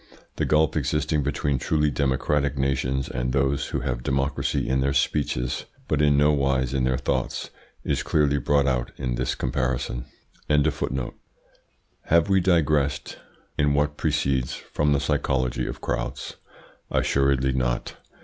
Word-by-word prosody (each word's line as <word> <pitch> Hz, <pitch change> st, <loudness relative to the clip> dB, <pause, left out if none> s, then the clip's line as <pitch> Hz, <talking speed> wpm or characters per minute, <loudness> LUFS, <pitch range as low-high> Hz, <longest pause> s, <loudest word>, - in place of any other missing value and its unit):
The -, -, +1 dB
gulf 75 Hz, -1 st, +2 dB
existing 75 Hz, 0 st, 0 dB
between 70 Hz, -1 st, -1 dB
truly 75 Hz, +1 st, +1 dB
democratic 70 Hz, +1 st, 0 dB
nations 65 Hz, 0 st, 0 dB
and 60 Hz, 0 st, -2 dB
those 70 Hz, +1 st, +1 dB
who -, -, -2 dB
have -, -, -2 dB
democracy 70 Hz, +3 st, -1 dB
in 65 Hz, 0 st, +1 dB
their 70 Hz, +1 st, +1 dB
speeches, 60 Hz, -4 st, 0 dB, 0.2 s
but -, -, +1 dB
in 75 Hz, -1 st, +4 dB
no 75 Hz, +1 st, +5 dB
wise 70 Hz, -2 st, +1 dB
in 65 Hz, -2 st, +1 dB
their 65 Hz, 0 st, +1 dB
thoughts, -, -, -2 dB, 0.3 s
is -, -, 0 dB
clearly 70 Hz, -2 st, +2 dB
brought 70 Hz, +2 st, +2 dB
out 65 Hz, -3 st, 0 dB
in 60 Hz, -2 st, -2 dB
this 60 Hz, +1 st, -1 dB
comparison. 65 Hz, -2 st, -2 dB, 2.0 s
Have 85 Hz, +3 st, +3 dB
we 95 Hz, 0 st, +4 dB
digressed 75 Hz, -6 st, +1 dB, 0.4 s
in 70 Hz, 0 st, +3 dB
what 75 Hz, +1 st, +1 dB
precedes 65 Hz, -2 st, 0 dB
from 75 Hz, 0 st, -1 dB
the 70 Hz, -, +3 dB
psychology 65 Hz, -4 st, 0 dB
of -, -, -6 dB
crowds? -, -, -3 dB, 0.5 s
Assuredly 70 Hz, -1 st, +2 dB
not. -, -, -1 dB
70 Hz, 140 wpm, -25 LUFS, 65-75 Hz, 2.0 s, no